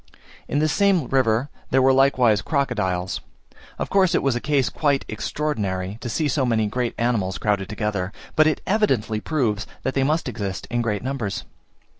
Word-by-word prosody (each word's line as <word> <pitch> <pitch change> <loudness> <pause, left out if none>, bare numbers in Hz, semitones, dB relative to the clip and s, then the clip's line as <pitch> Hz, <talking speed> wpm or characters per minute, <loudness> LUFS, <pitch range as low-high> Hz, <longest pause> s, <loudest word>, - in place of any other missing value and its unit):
In - - -1
this 155 +1 +2
same 195 -7 +3
river 130 0 +2 0.2
there 130 - +3
were 130 0 +5
likewise 130 -6 +4
crocodiles. 95 - -1 0.6
Of - - -4
course 190 -3 +4
it - - +1
was 135 -3 +2
a - - 0
case 140 -3 +1
quite 145 -3 0
extraordinary, 105 -9 -3
to 120 - -4
see 150 +7 0
so 140 0 +1
many 115 -3 +2
great 120 +3 -2
animals 110 -6 0
crowded 100 -1 0
together, 105 -3 -2 0.2
but 155 0 +5
it 155 - 0
evidently 130 - +1
proves 110 -7 -1 0.2
that 130 - -1
they 135 - +1
must 155 +3 +1
exist 100 -7 -4
in 120 0 +1
great 105 -3 -1
numbers. 125 -7 -3
125 Hz, 175 wpm, -23 LUFS, 105-140 Hz, 0.6 s, were